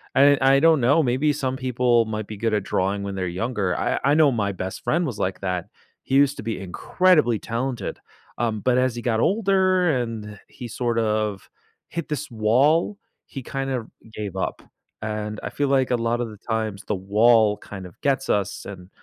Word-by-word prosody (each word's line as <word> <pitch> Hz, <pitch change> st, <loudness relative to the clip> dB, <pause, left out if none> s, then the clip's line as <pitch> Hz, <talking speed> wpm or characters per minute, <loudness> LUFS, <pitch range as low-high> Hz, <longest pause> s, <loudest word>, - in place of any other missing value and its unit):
and 140 Hz, +1 st, +6 dB
I 135 Hz, +1 st, +5 dB
don't 160 Hz, -3 st, +4 dB
know, 145 Hz, +6 st, +4 dB
maybe 135 Hz, +4 st, +1 dB
some 130 Hz, -2 st, -2 dB
people 125 Hz, -2 st, +2 dB
might 110 Hz, -1 st, -4 dB
be 105 Hz, -, -7 dB
good 115 Hz, 0 st, -1 dB
at 105 Hz, -2 st, +1 dB
drawing 100 Hz, +1 st, -1 dB
when 100 Hz, -1 st, -4 dB
they're 95 Hz, -1 st, -2 dB
younger, 95 Hz, 0 st, -2 dB
I -, -, 0 dB
I 140 Hz, -, +4 dB
know 155 Hz, -3 st, +5 dB
my 100 Hz, -4 st, 0 dB
best 95 Hz, 0 st, -6 dB
friend 170 Hz, +2 st, +1 dB
was 120 Hz, -7 st, -5 dB
like 95 Hz, 0 st, -2 dB
that, 90 Hz, -2 st, -2 dB, 0.4 s
he 135 Hz, -, -1 dB
used 140 Hz, 0 st, +4 dB
to -, -, -6 dB
be 115 Hz, 0 st, -3 dB
incredibly 120 Hz, -, +2 dB
talented, 120 Hz, +2 st, -3 dB, 0.4 s
um, 110 Hz, -3 st, -1 dB
but 125 Hz, -1 st, +2 dB
as 130 Hz, -2 st, +1 dB
he 120 Hz, -, -5 dB
got 115 Hz, -2 st, +1 dB
older 185 Hz, -, +2 dB
and 105 Hz, -3 st, -6 dB
he 120 Hz, -, -9 dB
sort 120 Hz, +1 st, -2 dB
of 105 Hz, -3 st, -1 dB, 0.4 s
hit 170 Hz, -2 st, -5 dB
this 145 Hz, -2 st, -4 dB
wall, 135 Hz, -, +2 dB, 0.3 s
he 135 Hz, -, -7 dB
kind 135 Hz, +1 st, -4 dB
of 125 Hz, -4 st, -3 dB, 0.3 s
gave 100 Hz, -3 st, -5 dB
up, 95 Hz, -, -3 dB, 0.4 s
and 105 Hz, -1 st, -4 dB
I -, -, -3 dB
feel 145 Hz, -1 st, -1 dB
like 135 Hz, -2 st, +2 dB
a 125 Hz, -, +4 dB
lot 115 Hz, +1 st, 0 dB
of 115 Hz, -, -3 dB
the 105 Hz, -, -11 dB
times, 110 Hz, -2 st, -3 dB
the 105 Hz, -, 0 dB
wall 105 Hz, +2 st, +4 dB
kind 95 Hz, -3 st, -9 dB
of 90 Hz, -, -14 dB
gets 135 Hz, -1 st, 0 dB
us 100 Hz, -1 st, -1 dB
and 95 Hz, -2 st, -9 dB
115 Hz, 200 wpm, -23 LUFS, 105-135 Hz, 0.4 s, and